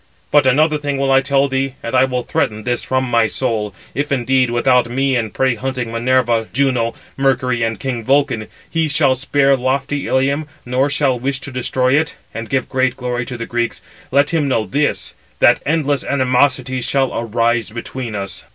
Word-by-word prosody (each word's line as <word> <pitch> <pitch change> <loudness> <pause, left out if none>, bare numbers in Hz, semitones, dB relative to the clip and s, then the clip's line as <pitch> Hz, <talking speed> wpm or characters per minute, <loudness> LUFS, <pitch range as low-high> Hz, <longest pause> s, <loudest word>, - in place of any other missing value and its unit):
But 145 -3 +5
another 150 +4 +3
thing 145 -1 -2
will 135 0 +1
I 135 0 +5
tell 140 0 +2
thee, 135 0 -2
and 115 - -4
I 130 0 +5
will 125 -1 -2
threaten 110 -2 -1
this 120 +1 -1
from 130 0 0
my 115 -3 +2
soul; 110 -3 -2 0.2
if 145 +1 -2
indeed, 130 -1 +2
without 120 0 +2
me 135 +2 +1
and 110 -4 -1
prey 130 -1 +1
hunting 125 -1 -4
Minerva, 120 -1 +1
Juno, 125 -3 +1 0.2
Mercury, 130 -3 +1
and 115 -2 -1
king 125 -4 -3
Vulcan, 130 -4 +1 0.2
he 165 -1 0
shall 140 -2 +3
spare 135 +1 +2
lofty 135 +2 -1
Ilium, 140 +3 +1 0.2
nor 130 +3 +1
shall 140 -3 +1
wish 135 +2 -2
to 140 - -7
destroy 130 0 0
it, 160 - -3 0.2
and 115 0 -6
give 130 -2 0
great 130 -1 0
glory 125 -1 -3
to 125 - -5
the 115 - -4
Greeks; 120 0 -2 0.3
let 140 +2 +2
him 160 -4 +1
know 115 -5 +1
this, 145 +4 -1 0.2
that 120 - +4
endless 145 -3 +1
animosity 130 -1 +1
shall 135 +1 0
arise 115 -1 0
between 120 0 -6
us." 100 -1 -6
130 Hz, 185 wpm, -18 LUFS, 120-135 Hz, 0.3 s, But